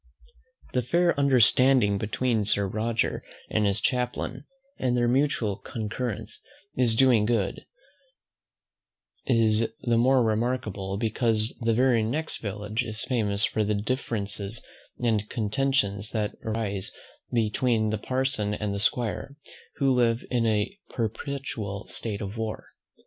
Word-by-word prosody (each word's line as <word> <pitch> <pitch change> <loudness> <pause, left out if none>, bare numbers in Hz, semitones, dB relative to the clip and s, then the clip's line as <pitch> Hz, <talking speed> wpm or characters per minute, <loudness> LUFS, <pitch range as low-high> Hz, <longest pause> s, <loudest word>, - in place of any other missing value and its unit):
The 125 - +2
fair 170 +7 +2
understanding 125 -5 +5
between 110 +1 0
Sir 100 -1 +1
Roger 110 +3 -1 0.3
and 105 -1 +2
his 100 0 +1
chaplain, 125 +3 -2 0.3
and 125 -1 +1
their 120 0 +2
mutual 125 -6 +1
concurrence 110 +1 -5 0.3
in 125 -1 +2
doing 125 -3 +5
good, 110 -5 -1 1.6
is 115 -2 +3
the 120 -2 +2
more 130 +1 +4
remarkable, 110 -4 -1
because 110 0 0
the 115 -2 +1
very 125 -1 +4
next 150 +9 -1
village 105 +2 -2
is 110 -2 -3
famous 105 -5 +1
for 110 - 0
the 105 0 0
differences 105 -2 -2 0.3
and 110 -4 0
contentions 110 -3 0
that 105 -2 -1
rise 110 -4 -2 0.4
between 110 -1 +1
the 110 - -1
parson 130 -5 -1
and 105 -1 -2
the 100 - -3
'squire, 120 +5 -1 0.4
who 135 -3 +2
live 120 -2 +2
in 120 -2 +2
a 110 - 0
perpetual 115 -3 -4
state 105 -2 0
of 100 +2 -5
war. 110 -1 -4
115 Hz, 125 wpm, -27 LUFS, 105-125 Hz, 1.6 s, understanding